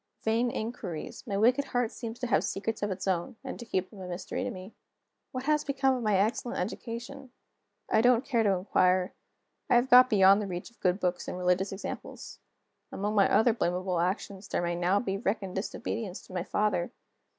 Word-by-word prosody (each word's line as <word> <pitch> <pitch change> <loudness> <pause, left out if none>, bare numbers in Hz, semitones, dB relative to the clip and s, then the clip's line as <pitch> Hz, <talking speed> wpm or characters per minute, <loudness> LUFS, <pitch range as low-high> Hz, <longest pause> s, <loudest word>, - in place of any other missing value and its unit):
Vain 230 +2 +2
inquiries! 220 -4 -5
My 200 -3 -1
wicked 250 +6 +3
heart 245 -4 -1
seems 230 -1 -6
to 250 - -3
have 235 - +2
secrets 225 +3 -3
of 205 - 0
its 190 0 -4
own, 185 +6 -1
and 265 - -6
to 235 - -8
keep 185 -3 -1
them 200 - -11
a 185 - -6
mystery 180 +7 -4
to 255 - -2
me. 190 -2 -9 0.6
What 255 0 -4
has 300 +1 +2
become 270 -2 +1
of 250 - -3
my 215 -3 +2
excellent 220 +4 0
education? 235 +7 -5 0.6
I 220 - +3
don't 245 +1 +4
care 240 -4 +1
to 215 - +3
inquire; 185 -1 +2 0.6
I - - +5
have 240 +2 +3
got 250 +1 +9
beyond 200 -2 +6
the 205 - -3
reach 180 +3 -6
of 235 - -29
good 180 +1 +1
books 180 -2 -1
and - - -4
religious 180 +2 +1
examples. 195 - -7 0.5
Among 205 +2 -2
my 200 -2 +4
other 220 +3 +5
blamable 180 -3 -1
actions 190 +2 -3
there - - -1
may 175 0 0
now 175 +3 +2
be 195 -3 -2
reckoned 195 -3 -2
disobedience 200 0 -4
to - - -14
my 180 - -1
father. 205 -3 0
205 Hz, 200 wpm, -29 LUFS, 185-240 Hz, 0.6 s, got